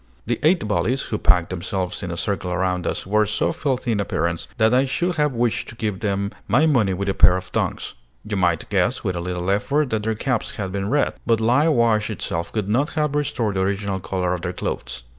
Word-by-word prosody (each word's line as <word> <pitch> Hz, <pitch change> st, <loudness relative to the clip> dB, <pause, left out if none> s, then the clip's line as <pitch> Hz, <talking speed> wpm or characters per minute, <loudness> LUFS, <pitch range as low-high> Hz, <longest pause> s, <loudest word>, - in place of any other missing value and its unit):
The 120 Hz, 0 st, -1 dB
eight 160 Hz, -, +3 dB
bullies, 125 Hz, +5 st, 0 dB
who 105 Hz, -, -3 dB
packed 90 Hz, -1 st, +3 dB
themselves 90 Hz, +1 st, -3 dB
in 95 Hz, -, -4 dB
a 85 Hz, -, -4 dB
circle 95 Hz, -1 st, -2 dB
around 90 Hz, -1 st, 0 dB
us, -, -, -2 dB
were 105 Hz, +2 st, +2 dB
so 105 Hz, -, 0 dB
filthy 130 Hz, -4 st, -1 dB
in 105 Hz, -, 0 dB
appearance 85 Hz, -3 st, -1 dB
that 110 Hz, 0 st, +4 dB
I 130 Hz, +1 st, +5 dB
should 175 Hz, +6 st, -1 dB
have 150 Hz, -2 st, +2 dB
wished 120 Hz, -1 st, 0 dB
to -, -, -9 dB
give 105 Hz, -4 st, -2 dB
them 100 Hz, -1 st, -1 dB, 0.2 s
my 125 Hz, +10 st, +4 dB
money 120 Hz, -11 st, +3 dB
with 100 Hz, +2 st, -3 dB
a 95 Hz, -, +1 dB
pair 90 Hz, -1 st, +5 dB
of 95 Hz, -1 st, -8 dB
tongs. -, -, -2 dB, 0.3 s
You 105 Hz, -, -2 dB
might 90 Hz, -4 st, +1 dB
guess, -, -, +1 dB
with 90 Hz, -, -1 dB
a 85 Hz, -, -3 dB
little 90 Hz, +1 st, -2 dB
effort, 140 Hz, +8 st, +1 dB
that 110 Hz, -1 st, 0 dB
their 110 Hz, +1 st, -1 dB
caps 125 Hz, +1 st, -1 dB
had 95 Hz, -2 st, -4 dB
been 100 Hz, +1 st, -2 dB
red; 145 Hz, +3 st, +2 dB
but 115 Hz, -2 st, +3 dB
lye 125 Hz, +7 st, +3 dB
wash 115 Hz, -6 st, +2 dB
itself 85 Hz, -5 st, -3 dB
could 105 Hz, -3 st, -2 dB
not 130 Hz, +9 st, +1 dB
have 150 Hz, -2 st, +1 dB
restored 120 Hz, -8 st, -1 dB
the -, -, +1 dB
original 100 Hz, 0 st, -1 dB
color 90 Hz, -1 st, -1 dB
of 90 Hz, -, -3 dB
their 90 Hz, 0 st, -3 dB
clothes. 65 Hz, -6 st, -4 dB
105 Hz, 230 wpm, -22 LUFS, 95-120 Hz, 0.3 s, I